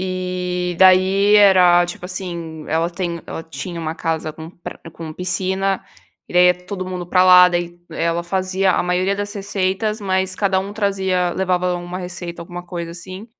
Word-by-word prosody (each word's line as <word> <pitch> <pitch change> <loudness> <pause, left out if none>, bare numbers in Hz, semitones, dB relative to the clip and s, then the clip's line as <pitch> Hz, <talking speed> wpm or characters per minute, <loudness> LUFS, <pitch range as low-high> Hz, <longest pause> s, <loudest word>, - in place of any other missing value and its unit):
e 180 -1 -3
daí 190 +2 +5
era, 180 -4 +6
tipo 175 0 -8
assim, 170 -4 -6
ela 165 +2 +1
tem 170 -1 -4
ela 165 - -6
tinha 165 +3 -7
uma 160 0 -3
casa 160 -1 -2
com 160 +1 -9
pra 175 - -10
com 160 -1 -8
piscina, 190 +3 -1 0.4
e - - -11
daí 180 0 +6
ia 180 - +5
todo 185 -2 -5
mundo 180 -1 -5
pra 185 +1 +3
lá. 180 0 +8
Daí, 175 0 -3
ela 170 +1 -1
fazia 185 +1 0
a - - +1
maioria 180 +2 0
das 205 0 -3
receitas, 200 +2 -2
mas 190 -1 0
cada 195 -2 +1
um 195 +1 -6
trazia 190 -4 0
levava 180 -1 0
uma 175 +1 -6
receita, 180 -2 -7
alguma 175 +1 -8
coisa 170 -2 -5
assim. 185 +4 -9
180 Hz, 175 wpm, -20 LUFS, 175-190 Hz, 0.4 s, lá